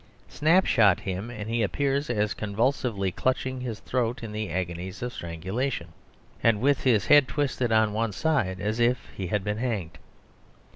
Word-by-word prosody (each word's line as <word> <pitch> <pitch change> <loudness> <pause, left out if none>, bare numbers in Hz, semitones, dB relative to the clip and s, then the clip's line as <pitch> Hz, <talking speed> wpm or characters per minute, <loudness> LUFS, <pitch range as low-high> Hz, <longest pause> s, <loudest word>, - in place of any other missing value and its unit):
Snapshot 150 - +4
him, 95 +4 -4
and 110 -3 -6
he 115 +1 0
appears 140 +6 0
as 105 -3 0
convulsively 105 -2 -1
clutching 130 +4 -1
his 120 -4 -5
throat 125 -1 -1
in 110 - -5
the 105 -1 -3
agonies 90 +3 -4
of 125 0 -4
strangulation, 90 +5 -3 0.5
and 115 -3 +3
with 140 +3 +2
his 110 -7 +3
head 145 -3 +6
twisted 130 -4 -1
on 110 -1 +3
one 115 0 0
side 110 - 0
as 105 +3 -2
if 120 +2 +1
he 95 - -4
had 105 +2 -1
been 105 +1 -2
hanged. 100 -10 -3
110 Hz, 160 wpm, -26 LUFS, 100-130 Hz, 0.5 s, head